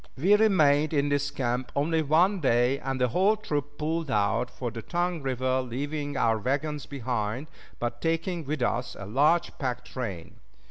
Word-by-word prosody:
We 185 +10 +5
remained 155 -8 +4
in 145 0 +2
this 145 0 +1
camp 125 -2 -2
only 160 +3 +1
one 170 +7 +3
day, 125 -1 +2
and 135 0 -3
the 125 -1 +2
whole 195 - +3
troop 145 -7 -3
pulled 160 0 -2
out 110 +3 +1
for 120 -2 -5
the 115 0 -6
Tongue 175 +3 -1
River, 130 -1 0
leaving 145 +3 -4
our 115 -1 +2
wagons 145 +5 -2
behind, 125 -1 -3 0.3
but 120 0 -4
taking 165 +1 -1
with 145 -2 -2
us 120 +1 -1
a 95 - -6
large 145 - +2
pack 130 -3 -3
train. 100 -10 -6
140 Hz, 170 wpm, -27 LUFS, 125-155 Hz, 0.3 s, We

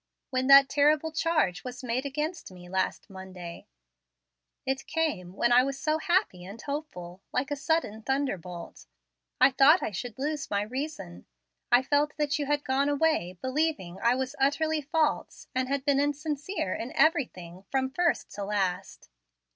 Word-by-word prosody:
When 260 0 0
that 275 0 +9
terrible 300 +3 +2
charge 310 - 0
was 250 0 -7
made 250 +3 -1
against 305 - -4
me 180 -1 -12
last 190 +1 -2
Monday 190 -3 -9 1.0
it 265 0 -2
came, 210 - -2
when 240 +4 +2
I 245 +1 +7
was 275 +1 -3
so 310 0 0
happy 345 - +1
and 200 +5 -9
hopeful, 195 - -6
like 265 +3 -1
a - - +1
sudden 285 -7 -1
thunderbolt 195 -10 -4 0.5
I 275 - +6
thought 280 +6 +5
I - - -2
should 220 +4 -6
lose 295 +2 -3
my 200 0 0
reason. 245 - -6 0.4
I 245 +1 +6
felt 290 +2 +1
that 295 -1 0
you 290 - -2
had 290 0 0
gone 275 +1 +1
away 285 - +1
believing 260 - -1
I 235 +2 +3
was 260 0 -3
utterly 310 +3 +1
false 305 +1 -1
and 255 0 0
had 275 0 -2
been 280 -2 +3
insincere 290 - -2
in 235 +3 -5
everything 235 - +1
from 265 -1 0
first 345 +4 0
to 205 - -5
last. 195 -2 -2
270 Hz, 160 wpm, -28 LUFS, 205-300 Hz, 1.0 s, that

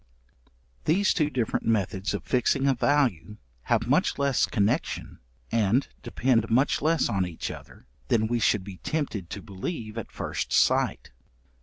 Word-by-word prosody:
These 195 +6 +3
two 150 -3 +1
different 125 -6 -1
methods 100 -3 0
of - - -5
fixing 135 +2 +1
a 135 - +4
value, 120 - +1 0.3
have - - +1
much - - +2
less 140 -2 +2
connection, 115 +8 -1 0.3
and 115 +4 +2
depend 115 -4 +1
much 130 +5 +2
less 160 +2 +2
on 95 -2 0
each 85 -2 -5
other - - -12 0.2
than 110 - +2
we 120 +2 0
should 105 -1 +2
be 95 -1 -9
tempted 115 - -3
to - - -7
believe 110 - -5
at 115 - -8
first - - -4
sight. - - +2
115 Hz, 150 wpm, -26 LUFS, 100-140 Hz, 0.3 s, a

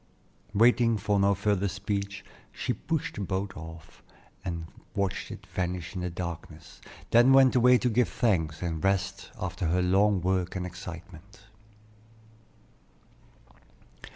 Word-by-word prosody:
Waiting 115 +1 +4
for 100 0 +1
no 100 0 +4
further 100 0 +1
speech, 100 +1 -4 0.3
she - - -2
pushed 160 -3 -3
the - - -5
boat 95 0 -3
off, 80 0 -11 0.4
and 85 -3 -4 0.3
watched 100 -2 -1
it - - -9
vanish 90 -1 -3
in 95 - -4
the 90 - -2
darkness; 85 -2 -7 0.3
then 120 +3 +6
went 135 -1 +6
away 125 0 +6
to 125 - 0
give 120 +1 +2
thanks, 85 - 0
and 80 -3 -3
rest 95 0 0
after 90 0 -3
her 90 +2 +2
long 100 +2 +3
work 90 0 0
and 90 -1 -2
excitement. 90 +2 -10
95 Hz, 130 wpm, -28 LUFS, 90-105 Hz, 0.4 s, then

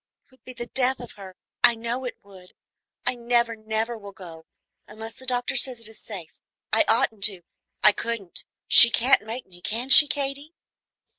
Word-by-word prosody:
It - - -39
would 260 - -27
be 255 - -11
the 240 - -8
death 260 +1 -2
of 245 - -10
her, 190 -2 -13 0.3
I 235 - +5
know 235 +3 -5
it 250 - -7
would. 190 -2 -17 0.5
I - - +2
never, 235 -1 -1
never 220 +2 -4
will 200 -3 -12
go, 165 -4 -13 0.4
unless 220 +1 -9
the 260 - -10
doctor 245 0 -2
says 255 -1 -1
it 230 - -9
is 220 - -12
safe. 185 -7 -10 0.4
I - - +3
oughtn't 215 -3 0
to, 195 -4 -1 0.4
I 210 - +8
couldn't; 210 -4 -6 0.2
she 235 - +9
can't 255 +3 +3
make 230 +4 -8
me, 175 -1 -17
can 235 +7 -5
she, 295 +2 +9
Katy?" 285 +3 -5
230 Hz, 190 wpm, -23 LUFS, 205-250 Hz, 0.5 s, she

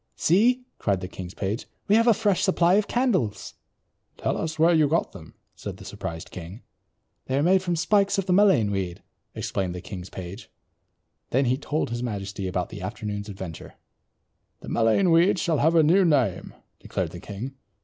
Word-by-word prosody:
"See," 240 +9 +3 0.2
cried 100 -3 +1
the 90 - -5
king's 90 0 -8
page, 100 +3 -3 0.2
"we 205 - +4
have 230 +1 +4
a 230 - +6
fresh 205 -3 +1
supply 180 -2 +3
of 205 +1 +3
candles." 225 - 0 0.6
"Tell - - -1
us 160 0 -3
where 165 +2 +5
you 155 -2 +4
got 165 +4 0
them," 80 -5 -13 0.2
said - - -7
the - - -12
surprised 80 -1 -6
king. 90 +5 -9 0.6
"They 130 - 0
are 140 - +2
made 185 +3 +4
from 175 -2 -1
spikes 200 +5 +2
of 195 - 0
the 185 - +1
mullein 180 - +4
weed," 95 -3 -3 0.3
explained 90 -2 -2
the - - -5
king's 90 0 -8
page. 90 +1 -8 0.8
Then 135 +2 +2
he 125 +1 +2
told 145 -1 -2
his 120 0 -3
majesty 100 -4 -4
about 90 - -2
the - - -8
afternoon's 105 +1 -5
adventure. 95 -5 -8 0.9
"The - - -8
mullein 115 - +3
weed 170 +4 +5
shall 165 -3 0
have 160 +3 +3
a 160 - +6
new 180 +6 +5
name," 135 - +1 0.2
declared - - -3
the - - -8
king. 110 +7 -7
135 Hz, 185 wpm, -25 LUFS, -, 0.9 s, a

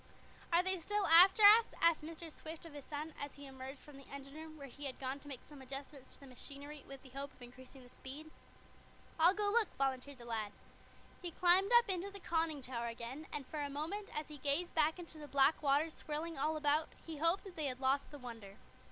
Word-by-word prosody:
"Are 340 +1 +5
they 375 0 +2
still 415 +4 0
after 365 +5 +8
us?" 435 +3 +10
asked 335 -1 +4
Mr. 325 +1 -8
Swift 320 +2 -8
of 330 - -10
his 290 -2 -9
son, 305 +1 -5
as 285 -1 -5
he 285 - -10
emerged 265 +1 -8
from 290 +1 -14
the 275 - -14
engine 275 0 -9
room, 315 0 -9
where 280 - -8
he 285 +2 -9
had 270 - -4
gone 265 +1 -3
to 290 - -15
make 270 -4 -7
some 290 -3 -13
adjustments 275 +1 -8
to - - -13
the 275 - -13
machinery, 280 +3 -10
with 275 -1 -10
the 265 - -13
hope 275 +1 -6
of - - -23
increasing 255 +2 -13
the 245 - -18
speed. 295 +4 -9 0.9
"I'll 345 +4 +6
go 410 0 +1
look," 450 -1 +4
volunteered 270 0 -1
the 240 - -11
lad. 220 -3 -3 0.7
He 355 - -4
climbed 365 +4 +4
up 475 0 +4
into 380 0 -1
the 400 0 -9
conning 325 -5 -1
tower 235 -2 -3
again, 235 +6 -6
and 285 - -4
for 300 +2 -4
a 285 - -2
moment, 330 +9 -4
as 300 0 -3
he 300 -1 -9
gazed 290 +6 0
back 315 +1 +3
into 335 -3 -9
the 295 - -8
black 280 +2 +4
waters 295 +2 +2
swirling 320 +2 -4
all 310 +3 0
about, 300 +1 +2 0.2
he 320 -2 -6
hoped 330 +5 +2
that 385 -3 -10
they 310 - -2
had 255 -1 -4
lost 270 +1 +1
the 290 - -9
Wonder. 225 -6 -9
295 Hz, 230 wpm, -36 LUFS, 270-330 Hz, 0.9 s, us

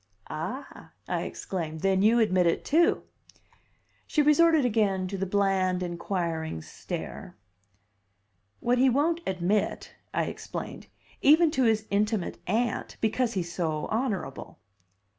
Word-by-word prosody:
"Ah," 200 - -6
I - - -1
exclaimed. 160 -4 -5
"Then 190 -1 +2
you 220 +4 +5
admit 185 -5 +3
it, 165 - 0
too!" 330 +4 +3 1.0
She 300 - +2
resorted 315 -1 +5
again 205 -5 +1
to 200 - -4
the 195 0 -2
bland, 190 -2 +1
inquiring 170 - -3
stare. - - -7 1.2
"What 245 +1 +2
he 265 +1 +5
won't 315 +7 +1
admit," 190 +3 -1 0.2
I - - 0
explained, - - -6 0.3
"even 315 +2 +6
to 265 -5 +2
his 220 -1 +2
intimate 210 -1 0
Aunt, 225 +4 -1
because 230 +2 0
he's 175 -4 -3
so 155 -4 -1
honorable." 220 - -3
200 Hz, 120 wpm, -27 LUFS, 180-250 Hz, 1.2 s, even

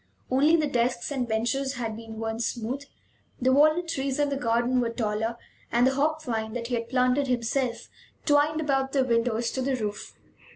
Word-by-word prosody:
Only 290 +5 +5
the 315 -2 +2
desks 245 -1 0
and 255 -4 -1
benches 240 +5 -1
had 230 -3 -3
been 225 0 -9
worn 225 0 -3
smooth; 240 +4 -3 0.5
the 260 +1 +3
walnut 310 +5 +4
trees 270 -4 -2
in 290 -1 +2
the 280 - -1
garden 240 0 +1
were 235 - 0
taller, 225 0 -2 0.3
and 240 +1 +4
the 265 - +3
hop 310 +3 0
vine, 220 -4 -3
that 235 -1 -4
he - - -3
had 230 -1 -2
planted 255 +2 +2
himself 245 0 -1 0.4
twined 295 +1 +3
about 270 -3 0
the 270 -2 +3
windows 230 -1 +1
to 260 - -2
the 265 +1 0
roof. 210 -4 -5
250 Hz, 190 wpm, -27 LUFS, 230-275 Hz, 0.5 s, Only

